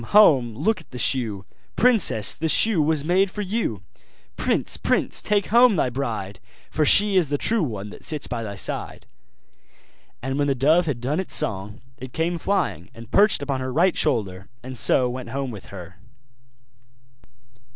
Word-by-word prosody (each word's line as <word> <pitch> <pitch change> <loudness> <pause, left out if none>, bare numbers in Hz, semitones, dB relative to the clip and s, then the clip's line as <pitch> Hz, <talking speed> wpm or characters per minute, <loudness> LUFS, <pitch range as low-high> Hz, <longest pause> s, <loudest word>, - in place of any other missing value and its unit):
home! 130 - +4
look 185 - -1
at 165 - -22
the 125 - -9
shoe! 110 -5 0 0.3
Princess! 215 - +3
the 160 +1 -3
shoe 210 0 +3
was 150 -1 0
made 185 +3 +2
for 210 +2 -5
you! 190 - -3 0.5
Prince! - - 0
prince! - - -1
take 205 -1 0
home 240 -2 +6
thy 130 -6 0
bride, 110 -7 -4 0.3
For 155 - +1
she 200 +5 +6
is 170 -6 +2
the 145 - 0
true 225 +8 +1
one 105 - -4
that - - -13
sits 150 -3 -4
by 120 -2 -4
thy 100 -3 -6
side!' 100 - -5 1.1
And 135 +2 -4
when 145 - +1
the 140 - +1
dove 155 +7 +2
had 130 -6 -3
done 140 +7 -1
its 190 - 0
song, 105 +3 -1 0.2
it 130 -1 -9
came 170 +1 -2
flying, 100 - -2
and 115 +1 -13
perched 205 -6 +4
upon 135 -2 -3
her 130 0 -4
right 175 +7 +2
shoulder, 100 -10 -1
and 130 +1 -8
so 125 +3 +2
went 125 -1 -6
home 135 +1 -4
with 105 -4 -10
her. 95 -2 -11
135 Hz, 175 wpm, -23 LUFS, 115-175 Hz, 1.1 s, home